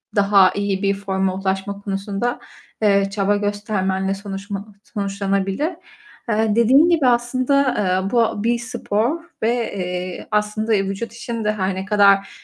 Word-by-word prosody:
daha 200 -2 +5
iyi 200 -1 -2
bir 200 0 +3
forma 195 -1 -1
ulaşma 195 +1 -3
konusunda, 200 +4 -3 0.4
eee, 200 -2 +3
çaba 200 0 +1
göstermenle 205 -2 -1
sonuçma 195 0 -6 0.2
sonuçlanabilir. 200 - -1 0.6
Eee, 215 -1 +1
dediğim 260 +8 +5
gibi 320 -6 +3
aslında, 255 +3 +2 0.2
eee, 190 0 0
bu 230 -3 +1
bir 235 +1 +1
spor 240 +4 -1 0.2
ve, 225 - +3 0.2
eee, 180 -1 -4
aslında, 210 +1 0
eee, 195 -1 +2
vücut 195 +4 -4
için 235 -1 -5
de 210 - +2
her 190 -2 -1
ne 190 +1 -4
kadar 200 -1 +4
200 Hz, 140 wpm, -21 LUFS, 195-225 Hz, 0.6 s, daha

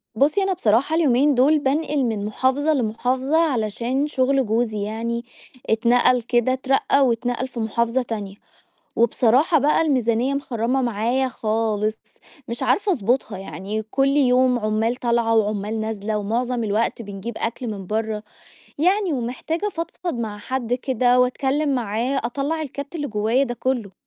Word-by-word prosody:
بُصّي 300 - +2
أنا 385 -1 +1
بصراحة 245 - +2
اليومين 285 -2 +3
دول 290 +5 +4
بأنقل 290 +1 0
من 220 -4 -1
محافظة 260 +8 +1
لمحافظة 255 +4 0
علشان 240 +4 -1
شغل 270 -1 +1
جوزي 220 -1 0
يعني، 230 +3 -3 0.4
اتنقل 240 +2 +3
كده 240 +2 +1
أترقى 270 +1 +2
واتنقل 245 +1 -1
في 245 -2 -8
محافظة 230 +3 0
تانية، 210 -5 -5 0.6
وبصراحة 250 +8 +3
بقى 295 +4 +3
الميزانيّة 255 -4 +1
مخرّمة 260 -2 -1
معايا 240 +3 0
خالص 215 -2 -1 0.5
مش 235 +1 -4
عارفة 410 0 +2
أضبطها، 235 - 0
يعني 195 +2 -5
كل 270 +5 +1
يوم 255 -2 +3
عمّال 215 +2 0
طالعة 235 -2 +1
وعمّال 215 0 0
نازلة 215 -1 -3
ومعظم 235 +4 -1
الوقت 220 +2 0
بنجيب 205 +2 -7
أكل 235 +2 -3
من 200 -4 -6
برّه، 215 0 -2 0.6
يعني 370 +3 +2
ومحتاجة 270 - -3
افضفض 345 -2 -4
مع 220 -3 -4
حد 245 +1 -2
كده 250 -1 +2
وأتكلّم 270 +3 +1
معاه 240 +3 -1
أطلع 285 +6 -2
الكَبت 280 +1 -7
اللي 295 -3 -2
جوّايا 220 +5 +1
ده 240 -2 -4
كلّه. 240 -4 -2
245 Hz, 140 wpm, -22 LUFS, 220-270 Hz, 0.6 s, دول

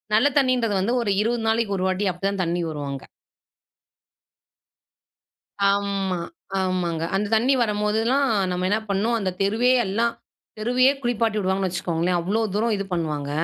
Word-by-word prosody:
நல்ல 250 +6 +5
தண்ணீன்றது 250 -5 +1
வந்து 235 +6 0
ஒரு 210 - 0
20 230 +1 0
நாளைக்கு 225 -3 0
ஒரு 185 - -1
வாட்டி 190 +2 0
அப்படிதான் 195 +2 -2
தண்ணி 175 +1 -1
வரும் 145 -2 -5
அங்க. 135 -1 -6 2.7
ஆமா, 200 -2 -1 0.4
ஆமாங்க. 180 -3 -1
அந்த 205 +1 0
தண்ணி 250 +5 +3
வரம்போதெல்லாம், 220 +5 +1 0.2
நம்ம 180 0 -1
என்ன 210 +2 +2
பண்ணோம் 220 +4 +1
அந்த 190 - -1
தெருவே 225 +6 +2
எல்லாம், 230 +5 0 0.4
தெருவையே 250 +5 +3
குளிப்பாட்டி 230 -3 0
விடுவாங்கன்னு 190 0 0
வச்சுக்கோங்களேன். 175 0 -1
அவ்ளோ 205 +6 0
தூரம் 225 0 +1
இது 195 - -3
பண்ணுவாங்க. 150 -4 -2
200 Hz, 140 wpm, -23 LUFS, 185-230 Hz, 2.7 s, நல்ல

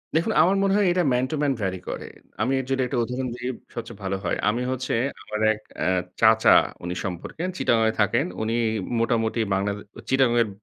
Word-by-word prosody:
দেখুন 160 - +2
আমার 185 +5 +4
মনে 195 0 +2
হয় 205 -2 +3
এটা 180 0 +2
ম্যান 125 +1 +2
টু - - 0
ম্যান 145 -2 +2
ভ্যারি 95 -2 -2
করে। - - -5 0.3
আমি 125 +5 +1
এর 130 - -4
যদি 135 0 +1
একটা 125 - -2
উদাহরণ 125 +2 -3
দিই 120 +1 -4 0.2
সবচেয়ে 115 -2 -7
ভালো 95 0 -1
হয়। 85 - -1
আমি 115 +3 -1
হচ্ছে 130 0 -2 0.3
আমার 105 - -5
এক 105 - -10 0.2
অ্যা - - +1 0.3
চাচা - - +6 0.3
উনি 90 +1 -3
সম্পর্কে, 95 - -5
চিটাগং 115 -7 +2
এ - - +1
থাকেন, 105 - +2 0.2
উনি 110 +1 -1 0.4
মোটামুটি 115 0 +1
বাংলাদে 100 +1 -1 0.3
চিটাগংয়ের 120 -3 +3
120 Hz, 190 wpm, -24 LUFS, 105-130 Hz, 0.4 s, চাচা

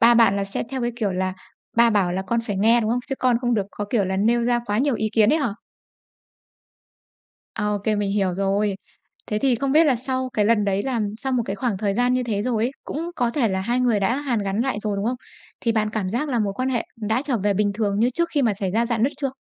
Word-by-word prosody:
ba 235 +1 +7
bạn 225 -4 +5
là 200 - 0
sẽ 195 - -4
theo 260 -2 -3
cái 240 - 0
kiểu 205 -5 -1
là 185 0 -1 0.4
ba 235 0 +6
bảo 190 -4 +2
là 190 +1 -2
con 230 +5 0
phải 205 -4 -4
nghe, 225 +4 +4
đúng 220 0 -1
không? 245 - +1
Chứ 270 - -1
con 250 -2 +3
không 245 -2 +1
được 200 -3 0
có 205 - -5
kiểu 215 -5 +2
là 190 +1 -2
nêu 235 +4 +2
ra 240 0 +2
quá 205 +1 0
nhiều 275 -1 +2
ý 220 0 -1
kiến 220 +4 +4
ấy 320 - +3
hả? 235 -9 -1 2.0
Ô 210 -1 0
kê, 215 -1 +2
mình 205 -1 -1
hiểu 195 -3 0
rồi. 195 +1 0 0.5
Thế 210 - -1
thì 265 -1 +2
không 270 +3 -1
biết 320 +2 +6
là 260 -4 +3
sau 260 +1 -3
cái 210 - +1
lần 215 -1 +3
đấy 200 0 0
là 255 -4 -1 0.2
sau 265 -1 -1
một 245 -2 +2
cái 195 +1 -3
khoảng 220 -2 -1
thời 200 -2 0
gian 245 +2 +2
như 255 - +1
thế 210 -4 -2
rồi 230 -2 0
ấy, 250 - 0
cũng 330 +4 -4
có 240 -2 +1
thể 240 -4 +1
là 190 0 -1
hai 240 +6 0
người 235 -5 +2
đã 200 +6 +1
hàn 270 -6 -1
gắn 195 +3 -1
lại 255 -4 -1
rồi, 205 -2 -2
đúng 200 - -2
không? 250 +1 0 0.4
Thì 230 - +1
bạn 215 -1 0
cảm 210 -4 -2
giác 245 +9 -2
là 245 -3 0
mối 205 -2 0
quan 255 +5 -2
hệ 245 -3 0
đã 225 +4 -1
trở 260 -5 0
về 200 0 +1
bình 205 0 +1
thường 205 -2 0
như 240 +3 +3
trước 340 +5 -1
khi 290 -3 +1
mà 220 -4 +2
xảy 195 -2 -3
ra 230 +4 +1
rạn 230 -2 -1
nứt 275 - +2
chưa? 275 -2 0
225 Hz, 280 wpm, -23 LUFS, 205-245 Hz, 2.0 s, ba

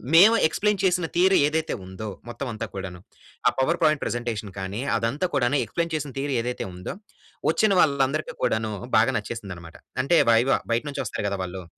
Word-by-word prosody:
మేము 210 +7 +8
ఎక్స్‌ప్లెయిన్ 205 +2 0
చేసిన 180 -2 +2
థియరీ 185 +2 +5
ఏదైతే 160 +1 -1
ఉందో, 95 +3 -6 0.2
మొత్తం 130 +3 -5
అంతా 110 +1 -4
కూడాను. 95 -2 -6 0.5
ఆ - - +6
పవర్ 165 +6 +1
పాయింట్ 155 -2 +3
ప్రజెంటేషన్ 115 -4 -3
కానీ 95 +5 -4 0.2
అదంతా 135 +11 -1
కూడాను 135 +1 +2
ఎక్స్‌ప్లెయిన్ 170 -1 -3
చేసిన 145 -3 -4
థియరీ 140 -1 -1
ఏదైతే 125 +1 -3
ఉందో 90 - -6 0.5
వచ్చిన 215 -2 +3
వాళ్ళందరికి 140 +1 +1
కూడాను 110 -3 0 0.3
బాగా 115 +4 +4
నచ్చేసిందన్నమాట. 100 -7 -7 0.3
అంటే 165 +5 +3
వైవా 120 +4 +4
బయట 115 +3 +1
నుంచి 140 -1 -3
వస్తారు 100 - -3
కదా 100 - -2
వాళ్ళు. 90 0 -6
125 Hz, 170 wpm, -25 LUFS, 110-155 Hz, 0.5 s, మేము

